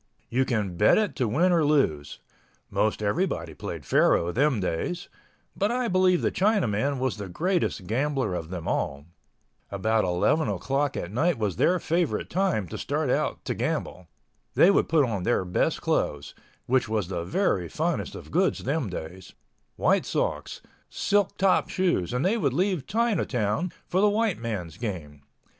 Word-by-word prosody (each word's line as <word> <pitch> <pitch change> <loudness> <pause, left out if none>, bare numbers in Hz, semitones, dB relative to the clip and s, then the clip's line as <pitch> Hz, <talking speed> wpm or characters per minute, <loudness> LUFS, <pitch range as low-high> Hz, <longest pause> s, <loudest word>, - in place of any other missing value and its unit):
You 130 +2 +2
can 105 -8 -2
bet 105 - +5
it 215 -2 0
to 125 -4 +1
win 165 - +2
or 170 -2 +3
lose. 80 - +1 0.5
Most 110 0 0
everybody 100 - -1
played - - -7
faro 85 +1 +3
them 135 +2 +2
days—but 175 - -4
I 245 -1 0
believe 185 -1 +3
the - - +2
Chinaman 145 - +1
was 130 -3 -1
the 100 -2 -6
greatest 175 - -1
gambler 130 0 -1
of 80 -2 -4
them 90 -3 -6
all. 70 +1 -2 0.6
About 110 +3 +1
11 90 - +1
o'clock 140 +1 -1
at 85 - -4
night 160 +9 +1
was 105 -6 -2
their 185 - +3
favorite 170 0 -1
time 180 - 0
to - - -6
start - - -1
out - - -1
to - - -1
gamble. 90 -2 -3 0.5
They 190 - +6
would - - +2
put 155 -3 +4
on 105 -6 -2
their 95 -1 +1
best 90 - 0
clothes—which 105 - -2
was 105 -5 -1
the 85 -3 -3
very 90 - 0
finest - - -2
of - - -10
goods - - +1
them 135 -3 -1
days—white 90 +1 -3
socks, - - -2 0.3
silk 205 -1 0
top 195 -1 +2
shoes, 175 - 0
and 125 +6 -1
they 210 +5 +2
would 140 - 0
leave 180 -3 0
Chinatown 175 - 0
for 185 - 0
the 210 - +5
white 210 - 0
man's 105 -8 -5
game. 85 -11 -6
125 Hz, 160 wpm, -26 LUFS, -, 0.6 s, They